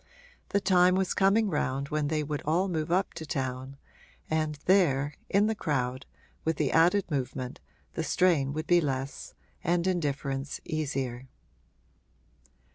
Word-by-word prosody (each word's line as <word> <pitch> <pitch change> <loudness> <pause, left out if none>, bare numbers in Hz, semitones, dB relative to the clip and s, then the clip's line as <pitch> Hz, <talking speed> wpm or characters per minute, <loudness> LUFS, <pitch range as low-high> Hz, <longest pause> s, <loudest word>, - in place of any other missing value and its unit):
The 200 - +2
time 180 -2 +4
was 190 -1 +1
coming 205 +3 +3
round 140 -5 -1
when 150 -1 0
they 155 0 0
would 145 0 -3
all 170 +6 +1
move 160 -3 -2
up 185 +2 +1
to - - -7
town, 130 -1 -3 0.5
and 155 -1 0
there, 150 -7 +3 0.2
in 200 +2 +4
the 220 - +1
crowd, 130 - -2 0.4
with 160 0 0
the - - +1
added 175 +3 +3
movement, 130 -2 -3 0.3
the 165 - -2
strain 160 -6 +2
would 155 +2 -3
be 175 +1 +4
less 135 -2 -4 0.3
and 175 +1 +1
indifference 140 -6 -2
easier. 135 -5 -3
155 Hz, 140 wpm, -29 LUFS, 135-180 Hz, 0.5 s, time